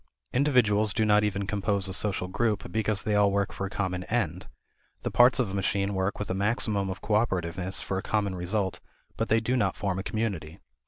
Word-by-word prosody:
Individuals 110 -7 +3
do 110 - +2
not 105 0 +4
even 100 -1 -1
compose 100 -1 -1
a 95 - -3
social 100 -2 0
group 105 +2 -1
because 110 -3 0
they 105 - -1
all 105 -1 +4
work 100 0 0
for 100 - -3
a - - -8
common 90 -3 -2
end. 110 -9 -2 0.6
The - - -2
parts 125 +1 +6
of 120 -7 0
a - - -7
machine 100 +1 0
work 95 +1 -1
with 105 - -4
a - - 0
maximum 100 0 0
of 95 - -6
cooperativeness 95 -4 +1
for 95 - -2
a - - -4
common 100 -2 -1
result, 95 +2 -2 0.4
but - - -2
they 110 - +4
do 115 +3 -1
not 100 -7 +1
form 95 -2 -2
a - - -4
community. 95 -7 -3
100 Hz, 210 wpm, -27 LUFS, 95-110 Hz, 0.6 s, parts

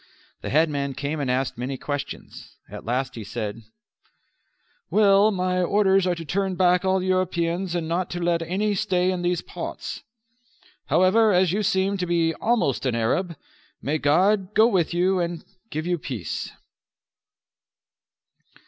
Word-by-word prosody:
The - - -5
headman 145 -3 +1
came 145 +3 -3
and 140 -3 -2
asked 125 -1 -1
many 130 +2 -3
questions. 145 0 -6
At - - -10
last 125 +2 -1
he 115 - -7
said: 105 +1 -5 1.3
"Well, 205 0 +5
my 185 -2 0
orders 195 0 +3
are 180 - +1
to 165 -1 -7
turn 190 +3 -1
back 180 0 +3
all 190 -1 +1
Europeans 185 -1 0
and 165 -2 -2
not 175 +2 -1
to 175 - -4
let 170 -1 +1
any 195 +5 -1
stay 185 -2 +1
in 180 -1 -3
these 175 -1 0
parts. - - -6 0.9
However, 210 +4 +4
as 180 -2 +3
you 205 +3 0
seem 195 0 +1
to 180 -1 -2
be 165 -1 +1
almost 215 - 0
an 120 - 0
Arab, 165 +10 0 0.4
may 155 +3 -1
God 190 +7 +2
go 220 - +6
with 190 -8 +2
you 180 +2 +2
and 170 -1 -3 0.2
give 155 +1 -4
you 175 -1 0
peace." 115 - -5
175 Hz, 150 wpm, -24 LUFS, 150-190 Hz, 1.3 s, go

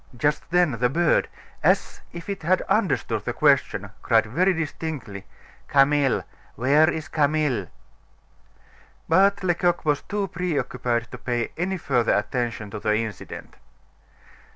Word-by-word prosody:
Just 150 +2 0
then 175 -2 +3
the 125 0 +2
bird, 170 +4 +2 0.4
as - - +1
if 170 -1 -9
it 200 -1 -4
had 180 +4 +1
understood 135 - 0
the 120 - -3
question, 130 -9 +2
cried 115 -2 +3
very 175 - +2
distinctly: 150 - -5 0.4
"Camille! 140 -1 +3 0.3
Where 145 +7 +4
is 160 -2 -4
Camille?" 145 - 0 1.4
But 195 +4 +3
Lecoq 175 -1 +1
was 145 -2 +1
too 205 -1 -3
preoccupied 125 -9 -2
to 125 - -8
pay 120 -2 -2
any 185 +3 -2
further 125 -8 +1
attention 115 -1 -2
to - - -5
the 105 +1 +1
incident. 110 -3 -6
145 Hz, 130 wpm, -24 LUFS, 120-170 Hz, 1.4 s, Where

